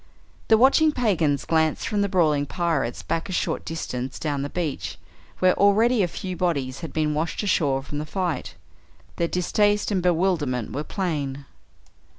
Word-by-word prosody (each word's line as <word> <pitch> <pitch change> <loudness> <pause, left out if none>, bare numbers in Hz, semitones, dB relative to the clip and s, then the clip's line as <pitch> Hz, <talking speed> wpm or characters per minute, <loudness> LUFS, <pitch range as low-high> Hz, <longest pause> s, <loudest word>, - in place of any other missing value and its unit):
The 220 - +6
watching 275 +6 +5
pagans 175 - +1
glanced 160 -1 +1
from 210 -2 0
the 200 - +1
brawling 155 -6 +2
pirates 160 -8 -1
back 165 +3 -2
a - - -4
short 180 - -1
distance 130 -6 -4
down 145 -3 -2
the 140 - -3
beach 160 -4 -3 0.4
where 185 0 +4
already 215 +4 +4
a 180 - +2
few 185 +2 -5
bodies 140 -8 -1
had 165 - -6
been 155 -1 0
washed 160 +7 -2
ashore 145 -8 +1
from 145 +1 -5
the 150 - -4
fight. 180 -1 -3 0.6
Their 170 - +1
distaste 205 +4 +1
and 190 -3 +1
bewilderment 165 - 0
were 145 - -2
plain. 145 -7 -3
165 Hz, 160 wpm, -24 LUFS, 145-190 Hz, 0.6 s, The